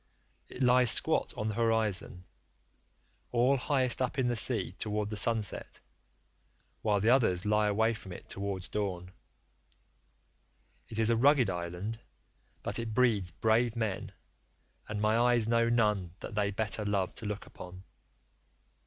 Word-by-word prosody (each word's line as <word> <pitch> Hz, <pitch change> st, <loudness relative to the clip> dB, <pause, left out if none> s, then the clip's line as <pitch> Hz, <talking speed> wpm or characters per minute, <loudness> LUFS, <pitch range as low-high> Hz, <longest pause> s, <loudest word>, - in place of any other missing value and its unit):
It 130 Hz, -, -4 dB
lies 125 Hz, -1 st, +5 dB
squat -, -, +3 dB
on 105 Hz, -, -2 dB
the 110 Hz, -, -2 dB
horizon, 110 Hz, -5 st, 0 dB, 1.1 s
all 125 Hz, +3 st, +3 dB
highest 130 Hz, -1 st, 0 dB
up 125 Hz, -, -1 dB
in 130 Hz, -2 st, +1 dB
the 120 Hz, -, 0 dB
sea -, -, +2 dB
towards 105 Hz, 0 st, -2 dB
the -, -, -3 dB
sunset, 110 Hz, -1 st, 0 dB, 1.0 s
while 105 Hz, -2 st, +1 dB
the 110 Hz, +4 st, +3 dB
others 110 Hz, -9 st, +2 dB
lie 105 Hz, 0 st, +2 dB
away 110 Hz, +3 st, +2 dB
from 105 Hz, -3 st, -10 dB
it -, -, -10 dB
towards 100 Hz, -2 st, -5 dB
dawn.75 90 Hz, -4 st, -4 dB, 1.8 s
It 110 Hz, -, -7 dB
is 110 Hz, 0 st, +3 dB
a -, -, +3 dB
rugged 130 Hz, -3 st, +4 dB
island, 90 Hz, +5 st, -5 dB, 0.6 s
but -, -, -2 dB
it 115 Hz, -2 st, -4 dB
breeds 110 Hz, -7 st, +2 dB
brave 110 Hz, +6 st, +1 dB
men, 110 Hz, -5 st, -3 dB, 0.8 s
and 105 Hz, -1 st, -3 dB
my 105 Hz, +1 st, +2 dB
eyes 120 Hz, -1 st, +3 dB
know 115 Hz, 0 st, +2 dB
none 105 Hz, -7 st, +1 dB
that -, -, -7 dB
they 105 Hz, -1 st, 0 dB
better 105 Hz, +1 st, -2 dB
love 100 Hz, -3 st, -1 dB
to 110 Hz, -, -7 dB
look 105 Hz, 0 st, -5 dB
upon. 90 Hz, +1 st, -11 dB
110 Hz, 145 wpm, -30 LUFS, 100-115 Hz, 1.8 s, lies